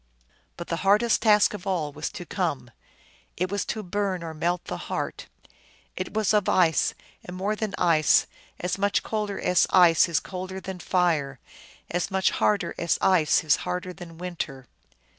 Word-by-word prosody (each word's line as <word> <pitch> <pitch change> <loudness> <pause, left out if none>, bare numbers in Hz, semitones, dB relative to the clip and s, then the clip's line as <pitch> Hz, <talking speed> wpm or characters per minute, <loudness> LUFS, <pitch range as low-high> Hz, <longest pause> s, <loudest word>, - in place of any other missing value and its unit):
But 170 - -7
the 170 - -1
hardest 210 +5 +3
task 210 -2 +4
of 200 -1 -8
all 165 -6 -1
was 150 +3 -4
to 175 - -7
come. 145 -11 -3 0.7
It 185 +1 -1
was 200 - -1
to 215 - -4
burn 190 -1 -2
or 165 -1 -6
melt 175 +3 -1
the - - -5
heart. - - -4 0.7
It 185 - -4
was 215 -1 +1
of 210 -2 +2
ice, 165 -4 +3 0.3
and 180 0 -8
more 200 +3 -1
than 215 -1 -3
ice: 160 -3 +4 0.3
as 180 +2 -2
much 200 0 +1
colder 210 -2 -3
as 180 -1 +3
ice 175 -1 +5
is 165 - +2
colder 185 0 -6
than 190 -1 -7
fire, 160 -8 0 0.5
as 175 +2 -1
much 190 -1 +1
harder 200 -5 +1
as 170 - +1
ice 165 -6 +3
is 155 -2 +3
harder 180 0 -4
than 170 -3 -11
water. 160 -7 -5
180 Hz, 170 wpm, -25 LUFS, 170-195 Hz, 0.7 s, ice